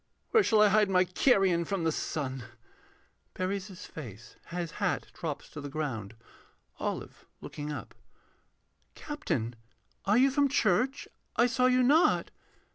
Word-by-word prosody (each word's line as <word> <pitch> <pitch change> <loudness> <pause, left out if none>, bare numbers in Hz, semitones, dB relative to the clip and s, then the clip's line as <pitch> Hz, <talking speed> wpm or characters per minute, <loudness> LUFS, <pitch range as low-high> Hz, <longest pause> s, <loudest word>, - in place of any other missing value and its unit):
Where 450 - +6
shall 220 - +4
I 210 - +6
hide 210 0 +4
my 185 -1 +4
carrion 185 -2 +3
from 190 0 -2
the 165 - +2
sun? 135 -6 -3 0.9
[Buries 190 +2 -2
his 185 -3 -10
face. 120 -5 -10
His 170 -1 -4
hat - - 0
drops - - -5
to 150 - -8
the 145 - -6
ground.] 120 -8 -4 0.6
OLIVE - - -5
[looking 150 0 -6
up.] 150 - -7 1.0
Captain, 160 - -3 0.5
are 205 +3 +4
you 265 +2 +5
from 280 +1 +3
church? 255 +1 +1 0.3
I 240 - +5
saw 250 +1 +3
you 255 0 +4
not. 300 +7 +4
185 Hz, 140 wpm, -30 LUFS, 150-245 Hz, 1.0 s, Where